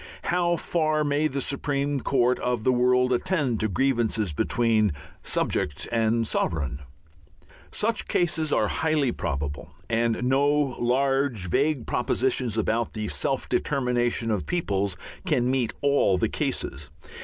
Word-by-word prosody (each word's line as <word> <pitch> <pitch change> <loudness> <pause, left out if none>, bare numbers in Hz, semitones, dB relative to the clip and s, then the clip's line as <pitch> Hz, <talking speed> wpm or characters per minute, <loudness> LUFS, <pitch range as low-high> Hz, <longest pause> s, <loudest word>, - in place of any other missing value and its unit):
How 175 0 +1
far 155 -2 0
may 145 +1 +1
the 140 -2 -3
supreme 140 +1 -1
court 125 -2 +2
of 125 -3 -1
the 130 - +4
world 125 0 +3
attend 130 - 0
to 110 - +1
grievances 115 - +1
between 110 +3 +2 0.3
subject 75 - -1
and 115 0 +1
sovereign? 70 -8 -1 0.9
Such 225 +1 -1
cases 160 -3 0
are - - +2
highly 155 -5 +1
probable, 70 -6 -4 0.2
and 115 0 +1
no 135 +3 +3
large, 135 -5 +1
vague 145 - +1
propositions 125 -2 0
about 115 +1 0
the 110 -2 -3
"self - - -1
determination" 120 -4 0
of 105 -4 -2
peoples 100 - -1 0.3
can 130 -6 +2
meet 130 -4 0
all 140 -9 +3
the - - 0
cases. - - -3
125 Hz, 130 wpm, -25 LUFS, 110-145 Hz, 0.9 s, the